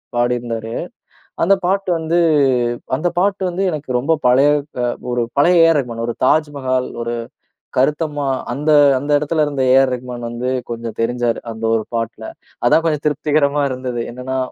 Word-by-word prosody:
பாடியிருந்தாரு. 120 Hz, -2 st, -1 dB, 0.7 s
அந்த 195 Hz, +4 st, +5 dB
பாட்டு 195 Hz, +1 st, 0 dB
வந்து 160 Hz, +2 st, 0 dB, 0.8 s
அந்த 175 Hz, +5 st, 0 dB
பாட்டு 195 Hz, +1 st, +1 dB
வந்து, 180 Hz, +3 st, -3 dB
எனக்கு 145 Hz, -3 st, -6 dB
ரொம்ப 145 Hz, +6 st, 0 dB
பழைய 135 Hz, +4 st, +5 dB, 0.3 s
அ -, -, +1 dB, 0.3 s
ஒரு 120 Hz, -1 st, 0 dB
பழைய 170 Hz, +3 st, +5 dB
ஏஆர் 165 Hz, -2 st, +4 dB
ரகுமான். 115 Hz, -2 st, -5 dB
ஒரு 120 Hz, -, -2 dB
தாஜ்மஹால், 135 Hz, -4 st, 0 dB
ஒரு 120 Hz, 0 st, -3 dB, 0.6 s
கருத்தம்மா. 145 Hz, +2 st, 0 dB, 0.3 s
அந்த 150 Hz, +4 st, 0 dB, 0.3 s
அந்த 145 Hz, +2 st, -4 dB
இடத்துல 150 Hz, +1 st, 0 dB
இருந்த 140 Hz, -2 st, -2 dB
ஏஆர் 135 Hz, -1 st, +4 dB
ரகுமான் 125 Hz, -1 st, -7 dB
வந்து 120 Hz, +2 st, -3 dB, 0.2 s
கொஞ்சம் 115 Hz, -1 st, -6 dB
தெரிஞ்சாரு, 120 Hz, 0 st, 0 dB
அந்த 110 Hz, 0 st, -9 dB
ஒரு 110 Hz, -, 0 dB
பாட்ல. 115 Hz, 0 st, -3 dB, 0.4 s
அதான் 165 Hz, -, +4 dB
கொஞ்சம் 150 Hz, -2 st, -1 dB
திருப்திகரமா 145 Hz, 0 st, +1 dB
இருந்தது. 125 Hz, -2 st, -4 dB
என்னன்னா 130 Hz, +2 st, -4 dB
130 Hz, 150 wpm, -18 LUFS, 120-155 Hz, 0.8 s, அந்த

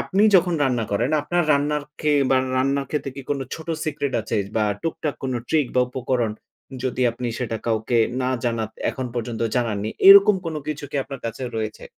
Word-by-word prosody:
আপনি 200 Hz, +2 st, +1 dB
যখন 175 Hz, -1 st, +2 dB
রান্না 125 Hz, -3 st, 0 dB
করেন, 120 Hz, +7 st, +1 dB
আপনার 175 Hz, +4 st, +1 dB
রান্নার 145 Hz, +1 st, +1 dB, 0.2 s
কে 150 Hz, -1 st, +2 dB, 0.2 s
বা 130 Hz, -, +5 dB, 0.2 s
রান্না 135 Hz, +2 st, +1 dB
খেতে 150 Hz, -2 st, -2 dB
কি 140 Hz, -, -7 dB
কোন 145 Hz, -, 0 dB, 0.2 s
ছোট 160 Hz, -, -10 dB, 0.2 s
সিক্রেট 145 Hz, -3 st, -2 dB
আছে 110 Hz, +1 st, -3 dB, 0.2 s
বা 110 Hz, -, +3 dB, 0.2 s
টুকটাক 160 Hz, -2 st, -2 dB
কোন 130 Hz, -1 st, -2 dB, 0.2 s
ট্রিক 155 Hz, -4 st, +2 dB
বা -, -, +6 dB
উপকরণ? 125 Hz, -3 st, -1 dB, 0.5 s
যদি 130 Hz, 0 st, -2 dB
আপনি 120 Hz, +1 st, -5 dB
সেটা 115 Hz, -3 st, -2 dB
কাউকে 115 Hz, +1 st, +1 dB, 0.2 s
না 125 Hz, -, 0 dB, 0.2 s
জানান 115 Hz, -2 st, -1 dB, 0.2 s
এখন 130 Hz, -1 st, -4 dB
পর্যন্ত 120 Hz, -1 st, -4 dB, 0.2 s
জানান 115 Hz, -4 st, 0 dB
নি। 110 Hz, -, -2 dB, 0.2 s
এরকম 200 Hz, +1 st, +9 dB
কোন 165 Hz, -, -3 dB
কিছু 150 Hz, -1 st, -4 dB
কি -, -, -3 dB
আপনার 135 Hz, -2 st, -8 dB
কাছে 115 Hz, +3 st, -6 dB
রয়েছে? 110 Hz, -1 st, -4 dB
130 Hz, 190 wpm, -23 LUFS, 115-150 Hz, 0.5 s, এরকম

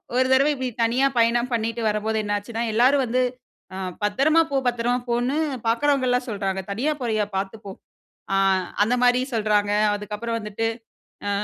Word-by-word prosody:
ஒரு 255 Hz, +1 st, +3 dB
தடவ 270 Hz, +2 st, +5 dB
இப்படி 260 Hz, -2 st, -3 dB
தனியா 245 Hz, +4 st, +2 dB
பயணம் 235 Hz, +1 st, +2 dB
பண்ணிட்டு 230 Hz, 0 st, -1 dB
வரம்போது, 215 Hz, +1 st, -1 dB
என்னாச்சுன்னா, 205 Hz, +3 st, -3 dB
எல்லாரும் 260 Hz, +5 st, +4 dB
வந்து 250 Hz, +2 st, 0 dB, 0.5 s
அ -, -, -5 dB, 0.3 s
"பத்திரமா 275 Hz, +11 st, +3 dB
போ. -, -, -1 dB
பத்திரமா 240 Hz, 0 st, +1 dB
போ" 240 Hz, -, 0 dB
ன்னு 275 Hz, +4 st, -1 dB, 0.3 s
பாக்குறவங்கலாம் 255 Hz, 0 st, +2 dB
சொல்றாங்க. 195 Hz, -3 st, -2 dB
"தனியா 250 Hz, +10 st, 0 dB
போறியா, 220 Hz, -3 st, 0 dB
பாத்து 195 Hz, +2 st, -2 dB
போ." -, -, -6 dB, 0.6 s
ஆ -, -, +3 dB, 0.5 s
அந்த 225 Hz, +4 st, +1 dB
மாரி 245 Hz, 0 st, +4 dB
சொல்றாங்க. 210 Hz, -2 st, +1 dB, 0.2 s
அதுக்கப்புறம் 210 Hz, +3 st, -4 dB
வந்துட்டு. 210 Hz, +1 st, -3 dB, 0.6 s
ஆ -, -, 0 dB
230 Hz, 150 wpm, -23 LUFS, 210-250 Hz, 0.6 s, தடவ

